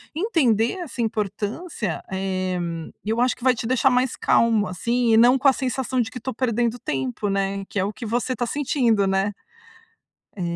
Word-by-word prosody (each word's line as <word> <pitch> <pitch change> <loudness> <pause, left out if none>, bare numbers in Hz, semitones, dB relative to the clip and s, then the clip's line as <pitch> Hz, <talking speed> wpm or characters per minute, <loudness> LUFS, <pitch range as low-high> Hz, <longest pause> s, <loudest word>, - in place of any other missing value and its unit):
entender 270 - +2
essa 270 -8 -5
importância, 215 - -3
eh, 185 -1 -2 0.4
eu 220 +3 -1
acho 250 +1 +2
que 245 - -15
vai 255 -1 +4
te 225 - -5
deixar 255 +2 +3
mais 250 0 +1
calmo, 225 -3 +3
assim, 235 +6 0
e 220 - +6
não 245 +3 +6
com 275 - +3
a 270 - +7
sensação 260 0 -2
de 225 -1 -3
que 250 - -7
estou 260 - -4
perdendo 240 -1 0
tempo, 130 - -3
né. 195 0 -1
Que 200 - -2
é - - +2
o 205 - -3
que 235 - -8
você 240 +3 -1
está 240 0 -2
sentindo, 235 -7 +1
né? 195 +2 +1 1.1
É 185 - -4
230 Hz, 190 wpm, -23 LUFS, 200-255 Hz, 1.1 s, a